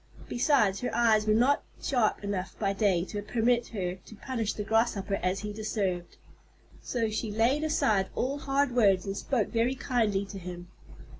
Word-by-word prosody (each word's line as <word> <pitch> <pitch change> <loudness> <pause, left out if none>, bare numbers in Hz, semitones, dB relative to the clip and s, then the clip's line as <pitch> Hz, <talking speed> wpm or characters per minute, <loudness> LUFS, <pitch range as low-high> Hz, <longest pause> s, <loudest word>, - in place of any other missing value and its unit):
Besides, 240 -6 +2
her 250 - -2
eyes 220 -3 +3
were 215 - +4
not 255 +5 +3 0.2
sharp 240 -6 0
enough 195 -2 -3
by 200 -2 0
day 195 -4 +2
to 205 +1 -5
permit 235 +3 +1
her 185 -4 -3
to 220 - -11
punish 225 -1 -3
the 210 - -4
Grasshopper 205 -3 +1
as 185 +2 -1
he 210 0 -5
deserved. 200 -5 -3 0.6
So 230 -3 -1
she 215 +1 -2
laid 235 +8 +2
aside 215 -10 +1
all 275 +3 -1
hard 280 -1 +1
words 200 -6 +4
and 195 0 -3
spoke 230 +1 -1
very 235 +3 +1
kindly 225 -7 0
to 195 0 -8
him. 175 -1 -8
215 Hz, 170 wpm, -29 LUFS, 195-240 Hz, 0.6 s, were